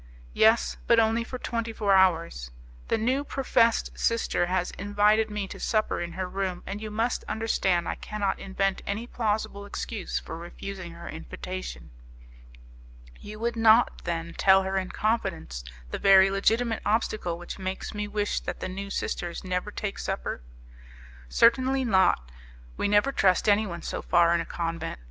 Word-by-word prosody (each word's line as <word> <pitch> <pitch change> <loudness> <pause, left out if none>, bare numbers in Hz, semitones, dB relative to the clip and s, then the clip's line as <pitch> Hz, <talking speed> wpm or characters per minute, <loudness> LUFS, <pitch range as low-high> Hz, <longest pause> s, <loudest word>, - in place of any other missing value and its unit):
"Yes, 225 +1 +4
but 235 -1 +6
only 225 +1 +2
for 255 +2 -6
twenty 230 -2 -3
four 205 -3 +1
hours; 170 - +2 0.4
the - - +1
new 260 +5 +1
professed 240 -5 +2
sister 230 -6 +1
has 180 0 0
invited 205 +2 +2
me 210 -2 -3
to - - -8
supper 215 -1 0
in 170 0 -5
her 185 +1 -3
room, 185 -1 -3
and 200 +2 -5
you 215 - -5
must 225 +3 -1
understand 190 -6 0
I - - -1
cannot 210 -2 -3
invent 195 0 -1
any 205 +4 -2
plausible 215 -4 -2
excuse 205 0 -4
for - - -6
refusing 175 +1 -7
her 170 0 -10
invitation." 165 - -7 1.3
"You 210 +1 -9
would 235 +1 -1
not, 225 +1 +4
then, 170 -1 -3
tell 190 0 +5
her 190 0 -2
in 190 -1 -1
confidence 190 - -2 0.3
the - - -3
very 195 0 +6
legitimate 225 +4 +1
obstacle 210 -5 0
which 175 +3 -8
makes 190 0 -4
me 210 0 -3
wish 205 0 -1
that - - -5
the - - -3
new 195 +2 -5
sisters 175 -3 -3
never 185 +2 -2
take 205 -1 -4
supper?" - - -3 0.9
"Certainly 260 - +3
not: 190 - +3 0.4
we - - 0
never 205 +6 +3
trust 190 -7 +2
anyone 205 -5 +2
so - - -4
far 170 0 +4
in 170 - +2
a - - -5
convent. 165 - -4
200 Hz, 160 wpm, -27 LUFS, 180-220 Hz, 1.3 s, but